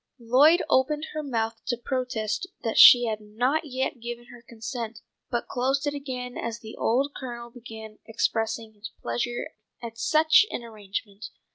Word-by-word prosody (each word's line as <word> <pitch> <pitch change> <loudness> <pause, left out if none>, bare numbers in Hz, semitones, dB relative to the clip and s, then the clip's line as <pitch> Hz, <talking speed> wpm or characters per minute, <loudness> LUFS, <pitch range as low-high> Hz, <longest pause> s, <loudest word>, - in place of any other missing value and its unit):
Lloyd 275 +8 +5
opened 295 +4 +2
her 310 - -2
mouth 230 -5 -2
to 245 -2 0
protest 240 -4 -2 0.2
that 225 - 0
she 245 -1 +10
had 215 -2 -2
not 245 +9 0
yet 260 -2 -3
given 240 +1 -7
her 245 - -13
consent, 230 0 -6 0.3
but 240 - -2
closed 270 +3 0
it 290 - 0
again 255 -3 -5
as 230 0 -3
the 220 -1 -10
old 275 +5 +1
Colonel 240 -2 -7
began 220 -3 -10
expressing 225 0 -1
his 210 +1 -9
pleasure 120 - -3 0.3
at 230 -1 -8
such 315 - +5
an 240 - -5
arrangement. 210 -2 -6
235 Hz, 155 wpm, -26 LUFS, 225-260 Hz, 0.3 s, she